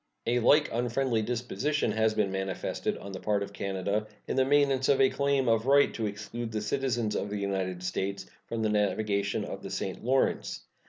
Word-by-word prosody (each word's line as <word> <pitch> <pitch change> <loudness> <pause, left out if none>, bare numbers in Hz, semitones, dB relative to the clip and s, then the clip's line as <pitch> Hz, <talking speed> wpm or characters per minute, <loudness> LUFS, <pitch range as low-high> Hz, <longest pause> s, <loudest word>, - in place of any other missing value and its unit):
A 120 +1 +2
like 145 +6 +5
unfriendly 120 0 0
disposition 125 +4 -1
has 110 0 +1
been 105 -3 +1
manifested 95 0 -2
on 100 - -8
the 95 - -6
part 105 0 0
of 100 0 -8
Canada 100 +2 -2 0.2
in - - -2
the 130 - +4
maintenance 135 -1 +3
of 140 - +4
a 135 -1 +5
claim 140 -2 +1
of 115 +1 +2
right 140 +1 +5
to 110 -2 -2
exclude 110 +3 -5
the 110 - -1
citizens 120 -4 -1
of 100 - -2
the 105 - -3
United 95 -2 -2
States 95 +1 -2 0.2
from 115 -1 -2
the 110 - +2
navigation 100 -1 0
of - - -6
the - - -7
St. - - -4
Lawrence. 130 +3 +1
110 Hz, 195 wpm, -29 LUFS, 100-130 Hz, 0.2 s, like